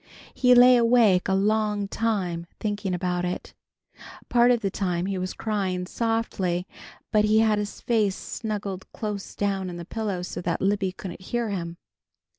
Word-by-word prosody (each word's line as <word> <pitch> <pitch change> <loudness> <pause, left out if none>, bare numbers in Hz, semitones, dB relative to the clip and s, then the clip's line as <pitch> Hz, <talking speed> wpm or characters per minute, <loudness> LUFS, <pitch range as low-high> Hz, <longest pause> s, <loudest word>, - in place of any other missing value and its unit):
He 250 -1 +5
lay 250 +1 +8
awake 230 -6 +4
a 190 - +2
long 210 0 +1
time 190 -7 -1
thinking 205 -3 -2
about 180 0 -1
it. 180 0 -4 0.8
Part 240 0 +5
of 240 -2 +3
the 195 -3 -1
time 180 -3 -1
he 195 -1 -2
was 185 0 -4
crying 190 -4 -2
softly, 195 -5 -1 0.5
but 215 -1 +4
he 215 +1 +3
had 220 -1 +3
his 205 0 -5
face 215 -5 +1
snuggled 200 -4 -5
close 210 -3 -5
down 195 -2 -1
in 175 - -6
the 170 - -7
pillow 200 -3 -3
so 180 - -5
that 170 -1 -1
Libby 195 -1 +1
couldn't 185 -1 -8
hear 235 +4 -2
him. 170 -3 -4
200 Hz, 165 wpm, -25 LUFS, 185-220 Hz, 0.8 s, lay